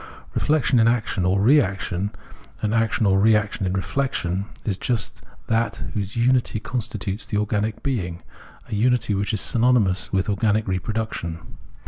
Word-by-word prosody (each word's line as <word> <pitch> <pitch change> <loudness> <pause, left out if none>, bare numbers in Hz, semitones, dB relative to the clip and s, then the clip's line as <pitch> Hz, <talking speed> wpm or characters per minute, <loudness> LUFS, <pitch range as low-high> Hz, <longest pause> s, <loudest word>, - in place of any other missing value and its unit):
Reflexion 145 -4 +2
in 115 - +5
action 110 -5 +1
or 95 +2 +2
reaction, 100 -6 +2 0.5
and 105 0 +1
action 115 -1 +1
or 95 -1 +4
reaction 105 -2 +2
in 90 - -1
reflexion, 95 -3 -1 0.2
is 100 - 0
just 120 -4 -1 0.2
that 115 +1 0
whose 100 -1 -3
unity 120 -1 +2
constitutes 105 -3 -4
the 105 - -3
organic 105 +1 -1
being, 90 - -2 0.4
a - - -7
unity 115 0 +2
which 100 +1 -1
is 110 - +1
synonymous 115 -8 +2
with 95 -1 +1
organic 105 +1 +1
reproduction. 95 -3 -3
105 Hz, 140 wpm, -23 LUFS, 95-115 Hz, 0.5 s, in